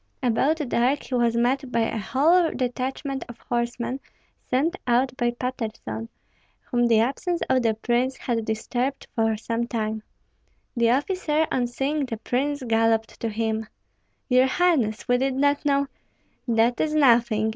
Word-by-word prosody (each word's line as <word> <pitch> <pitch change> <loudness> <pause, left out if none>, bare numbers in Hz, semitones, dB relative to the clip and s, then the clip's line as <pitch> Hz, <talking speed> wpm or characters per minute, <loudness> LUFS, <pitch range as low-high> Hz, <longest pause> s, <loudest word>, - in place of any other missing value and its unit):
About 260 +6 +2
dark 250 +4 +1
he - - -8
was 235 -2 +2
met 255 +2 +1
by 235 - +1
a 225 0 -1
whole 320 - +3
detachment 265 +2 -3
of 240 - -9
horsemen 240 +2 -2 0.5
sent 295 +8 +1
out 250 +1 +2
by 240 -2 +1
Patterson, 230 -2 -5 0.5
whom 240 -1 +1
the 225 -2 +4
absence 305 - 0
of 260 -1 +3
the 225 -2 +1
prince 245 +3 0
had 230 -2 -2
disturbed 245 +5 -2
for 225 -1 +1
some 230 +2 -2
time. 220 -2 -2 0.7
The 235 -1 +3
officer, 305 +3 +1
on 245 -1 +1
seeing 275 +4 -1
the 225 - -4
prince, 275 +5 -1
galloped 225 -1 +1
to 230 - -2
him, 220 0 -2 0.6
"Your 255 0 +4
highness, 265 -9 +1
we 245 0 +3
did 265 0 0
not 285 +1 +2
know 280 -1 +2 0.3
" - - -42
"That 235 +2 +3
is 310 -1 0
nothing!" 235 -6 +4
245 Hz, 155 wpm, -24 LUFS, 230-270 Hz, 0.7 s, the